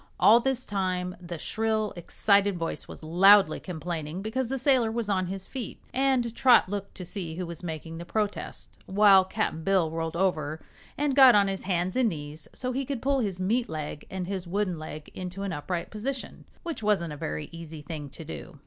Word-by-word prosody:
All 230 +3 +7
this 260 0 0
time 185 -2 -2
the 170 -1 -6
shrill, 220 +3 -1
excited 200 +2 +2
voice 165 -1 -3
was - - -11
loudly 190 +2 +6
complaining 170 0 -5
because 235 +3 -2
the 270 - -1
sailor 255 -4 +3
was 230 -2 -2
on 185 -2 +1
his 190 +1 -4
feet, 260 -3 -6
and 260 -3 +2
Trot 250 -5 +6
looked 200 0 -5
to 180 - -7
see 170 -3 -5
who 180 +1 -3
was 170 -2 -8
making 165 -1 -6
the - - -5
protest, 210 +3 -3
while 195 -1 +6
Cap'n 190 -4 -2
Bill 185 -4 +2
rolled 165 0 -3
over 160 -4 0 0.4
and 285 -2 +1
got 265 -4 +9
on 200 -1 +5
his 195 -1 -3
hands 180 -1 0
and 255 -3 +3
knees 150 -3 -7
so 255 0 -4
he 270 +2 -1
could 270 -1 -3
pull 275 0 +2
his 200 -6 -2
meat 230 +6 0
leg 150 -2 -5
and 190 -1 -4
his 185 -1 -4
wooden 185 -2 -1
leg 155 -1 -8
into 185 +1 -6
an 200 - -2
upright 170 +3 -4
position, 255 +5 -5 0.2
which 335 -8 -5
wasn't 195 -7 +1
a - - -6
very 75 - -4
easy 165 -2 -9
thing 145 -1 -6
to 160 +4 -10
do. 160 0 -9
190 Hz, 200 wpm, -27 LUFS, 165-220 Hz, 0.4 s, got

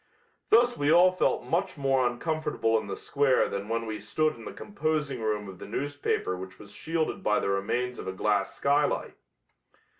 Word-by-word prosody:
Thus 240 +2 +5
we 145 +1 +1
all 175 +2 +7
felt 185 - +1
much 185 +1 -1
more 135 -2 +2
uncomfortable 150 -2 -1
in 110 - -8
the - - -4
square 140 -2 +2
than 100 +2 -5
when 115 0 -1
we 110 -1 -4
stood 155 +9 0
in 115 - -12
the - - -6
composing 155 - -2
room 105 -2 -1
of 95 -2 -10
the - - -8
newspaper 145 -5 -2
which 95 +1 -9
was 100 -1 -13
shielded 160 -1 -2
by 105 0 +2
the - - -1
remains 120 +6 -1
of - - -7
a - - -1
glass 100 +1 0
skylight. 145 +1 +1
125 Hz, 185 wpm, -28 LUFS, 105-155 Hz, -, all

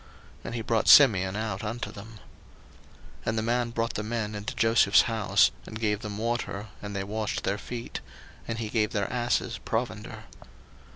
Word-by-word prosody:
And 120 - -5
he 115 - -3
brought 115 0 0
Simeon 100 -9 +7
out 105 -2 -3
unto 115 +3 -4
them. 110 +3 -11 1.1
01:043:024 - - -15
And 110 - 0
the - - +1
man 120 +1 0
brought 115 0 -2
the - - -2
men 110 -1 -3
into 105 0 -5
Joseph's 115 -3 +5
house, 110 -3 +3 0.2
and 110 - -7
gave 105 -2 0
them 105 -2 -6
water, 110 -2 -3
and 105 -1 -6
they 95 - -1
washed 105 +2 -3
their 100 +1 -1
feet; 120 +1 -6 0.5
and 115 - -3
he 110 -2 -3
gave 110 -1 0
their 100 0 -1
asses 120 -3 0
provender. 110 -2 -4
110 Hz, 175 wpm, -27 LUFS, 105-115 Hz, 1.1 s, Simeon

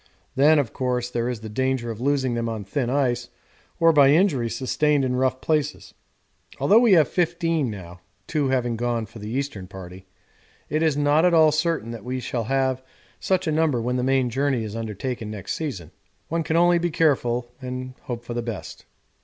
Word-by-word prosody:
Then, 150 +4 +5
of 140 -6 0
course, 125 -2 -2
there 120 0 -1
is 120 -4 -4
the 110 - -7
danger 130 +1 -1
of 110 +1 -8
losing 135 -2 +1
them 115 -1 -2
on 110 -2 -4
thin 120 +5 -2
ice 125 -3 0 0.5
or 165 0 +5
by 140 -2 +6
injury 145 -7 +3
sustained 135 +4 +1
in 125 -1 -1
rough 130 0 0
places. 150 -2 -1 0.7
Although 215 +3 +5
we 235 -4 +5
have 160 -4 +6
fifteen 165 -5 0
now 90 -4 -9 0.2
(two 150 +2 0
having 120 -3 0
gone 120 -1 -1
for 110 +2 -13
the 105 +1 -7
Eastern 125 -7 -3
Party) 95 0 -11 0.6
it 155 - 0
is 155 -3 +2
not 145 +2 +3
at 180 -1 +4
all 160 -1 +6
certain 155 -7 -1
that 115 -3 -8
we 130 +2 -3
shall 120 -2 -3
have 130 +1 0 0.4
such 190 -2 0
a 160 - 0
number 155 -5 +2
when 125 +2 -1
the - - 0
main 130 -1 +1
journey 135 -1 0
is 110 0 -6
undertaken 115 +1 -4
next 105 -2 -5
season. 120 - -5 0.4
One 165 +1 0
can 160 +1 0
only 175 0 +4
be 175 +1 0
careful 125 -7 +1
and 130 0 -5
hope 120 -2 -4
for 120 - -6
the 120 - -2
best.' 115 -4 -7
130 Hz, 195 wpm, -24 LUFS, 115-150 Hz, 0.7 s, by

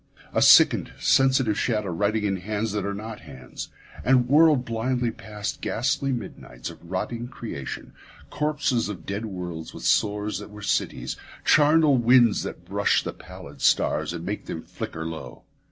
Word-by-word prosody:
A - - +2
sickened, - - +6
sensitive 130 -5 +3
shadow 105 -6 0
writhing 105 +5 0
in 100 -2 0
hands 105 +3 -3
that 100 -1 -2
are 100 - -2
not 110 +1 -7
hands, 65 - -9 0.3
and 125 -1 +4
whirled 150 -2 +5
blindly 120 +1 -1
past 105 -1 -6
ghastly 135 +3 0
midnights 65 - -6
of - - -16
rotting 115 +6 -3
creation, 110 - -7 0.4
corpses 145 -7 0
of 90 -6 -7
dead 100 +3 -3
worlds 90 -4 -6
with - - -9
sores 105 -1 +1
that 105 - -9
were 105 0 -11
cities, - - -1 0.3
charnel 150 -1 +5
winds 120 -1 +5
that - - -7
brush - - +1
the - - -4
pallid - - -12
stars - - +2
and 85 0 -6
make 105 +3 -4
them 80 - -5
flicker 80 0 -6
low. 80 -1 -7
110 Hz, 155 wpm, -25 LUFS, 100-125 Hz, 0.4 s, sickened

